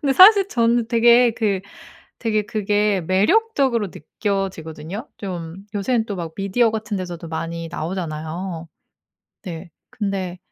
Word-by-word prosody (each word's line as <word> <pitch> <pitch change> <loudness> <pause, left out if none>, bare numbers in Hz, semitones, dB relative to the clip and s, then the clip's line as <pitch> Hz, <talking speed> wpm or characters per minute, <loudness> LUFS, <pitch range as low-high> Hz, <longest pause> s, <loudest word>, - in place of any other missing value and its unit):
근데 275 -2 +2
사실 395 +3 +8
저는 235 - +2
되게 235 +1 +6
그 205 -5 0 0.6
되게 215 -2 +1
그게 210 -1 +1
매력적으로 235 - +2
느껴지거든요. 190 - -4
좀 175 -4 -6 0.2
요새는 225 +3 +1
또 205 - -4
막 165 -2 -5
미디어 215 +4 +2
같은 215 -2 -3
데서도 175 -2 -6
많이 165 +1 -4
나오잖아요. 165 0 -4 0.8
네. 170 0 -7 0.2
근데 195 -6 -3
200 Hz, 275 characters per minute, -21 LUFS, 175-230 Hz, 0.8 s, 사실